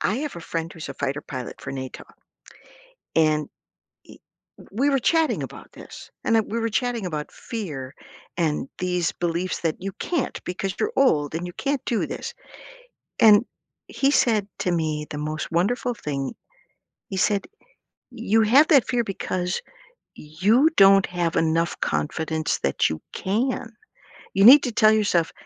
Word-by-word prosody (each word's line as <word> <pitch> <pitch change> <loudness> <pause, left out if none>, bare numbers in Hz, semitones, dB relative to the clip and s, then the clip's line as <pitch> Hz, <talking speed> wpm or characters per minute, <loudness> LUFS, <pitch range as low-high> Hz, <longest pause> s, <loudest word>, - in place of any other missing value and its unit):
I 215 - 0
have 290 -4 -4
a 170 - -7
friend 165 +1 -4
who's 160 -4 -8
a 140 - -6
fighter 140 +2 -2
pilot 130 -4 -7
for 135 - -6
NATO, 130 -1 -7 1.1
and, 155 -2 +3
e - - -25 1.2
we 275 +7 +1
were 275 - +2
chatting 325 +5 +1
about - - -9
this, - - -12
and 230 - +3
I 225 - +5
we 225 +2 -4
were 230 - 0
chatting 235 -3 -1
about 150 -3 -4
fear 150 - -6 0.4
and 155 -5 -1
these 180 -2 0
beliefs 175 +1 -2
that 165 -2 -1
you 195 0 -4
can't 335 -7 -2
because 190 +1 -3
you're 435 +2 -1
old 155 - +2
and 170 +2 -3
you 175 - -7
can't 275 +6 -2
do 230 - 0
this, - - -6 0.9
and 215 0 +7 0.4
he 275 +1 +1
said 215 -7 +2
to 180 - 0
me 155 -3 -1
the 150 - -6
most 155 +2 -4
wonderful 245 +9 0
thing. 140 - -4 0.7
He 190 - -5
said, 200 +1 +1 0.7
"You 225 -2 +1
have 265 +8 +5
that 280 -6 +5
fear 240 -1 +1
because 185 -2 -3 0.6
you 205 - +2
don't 195 0 +7
have 175 -2 -2
enough 165 +1 +1
confidence 155 - -1
that 70 - +1
you 80 - -4
can. 225 +4 -2 0.6
You 195 +1 +4
need 275 +5 +10
to 245 - -2
tell 215 -1 +5
yourself 200 -6 +1
185 Hz, 160 wpm, -24 LUFS, 160-230 Hz, 1.2 s, need